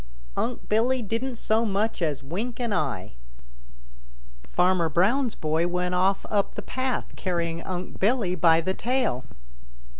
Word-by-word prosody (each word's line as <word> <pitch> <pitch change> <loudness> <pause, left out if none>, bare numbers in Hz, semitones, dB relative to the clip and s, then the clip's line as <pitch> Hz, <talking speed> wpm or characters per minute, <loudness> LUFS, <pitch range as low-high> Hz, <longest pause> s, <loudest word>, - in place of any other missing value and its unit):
Unc' 245 0 -2
Billy 240 +4 +2
didn't 230 +5 -2
so 220 0 +1
much 215 -1 0
as 150 -5 -1
wink 210 - -4
an 235 -3 -1
eye. 120 - -1 1.4
Farmer 180 - +3
Brown's 225 - +2
boy 160 +2 +1
went 180 0 -1
off 190 +2 +2
up 200 -2 0
the - - -5
path 260 -1 -2
carrying 170 -2 -2
Unc' 180 0 -5
Billy 210 -3 +2
by 165 -2 +5
the 185 +3 -1
tail. 230 - 0
190 Hz, 140 wpm, -26 LUFS, 170-230 Hz, 1.4 s, by